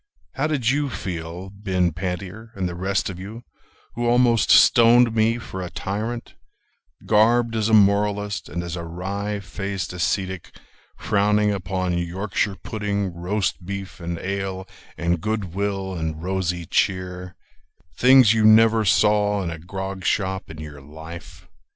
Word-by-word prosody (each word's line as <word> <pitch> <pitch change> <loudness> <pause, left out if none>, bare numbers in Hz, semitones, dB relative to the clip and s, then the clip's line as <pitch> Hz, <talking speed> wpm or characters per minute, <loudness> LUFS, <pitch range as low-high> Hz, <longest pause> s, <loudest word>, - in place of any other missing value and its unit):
How 140 +3 0
did 140 -7 -1
you 145 0 0
feel, 90 -3 -6
Ben 95 -3 0
Pantier, 95 +5 -5
and 95 -2 -2
the 90 - -5
rest 95 +2 -1
of 95 -2 -6
you, 110 +5 -8 0.5
Who 120 +1 -2
almost 120 -1 +3
stoned 120 0 +6
me 115 +1 +2
for 95 -5 -7
a 90 - -5
tyrant 105 +6 -4 0.7
Garbed 115 +2 +3
as 110 0 0
a - - 0
moralist, 105 0 +2
And 85 0 -4
as 85 0 -5
a 85 - -5
wry 100 +5 -4
faced 100 -2 -5
ascetic 95 +1 -2 0.4
frowning 105 +1 +2
upon 95 -2 -2
Yorkshire 95 +3 -2
pudding, 100 -3 -2
Roast 90 +3 -2
beef 100 +1 -6
and 85 0 -4
ale 95 0 -4 0.3
and 85 -1 0
good 105 -5 -3
will 95 -1 -2
and 80 -2 -4
rosy 90 -2 -2
cheer— 90 +1 -1 0.6
Things 130 -3 +6
you 110 -1 +1
never 110 +1 +6
saw 105 +1 +3
in 85 - -3
a 85 - -7
grog 95 +2 -6
shop 95 0 -1
in 80 - -9
your 75 -2 -9
life? 80 +5 -11
95 Hz, 145 wpm, -23 LUFS, 90-105 Hz, 0.7 s, stoned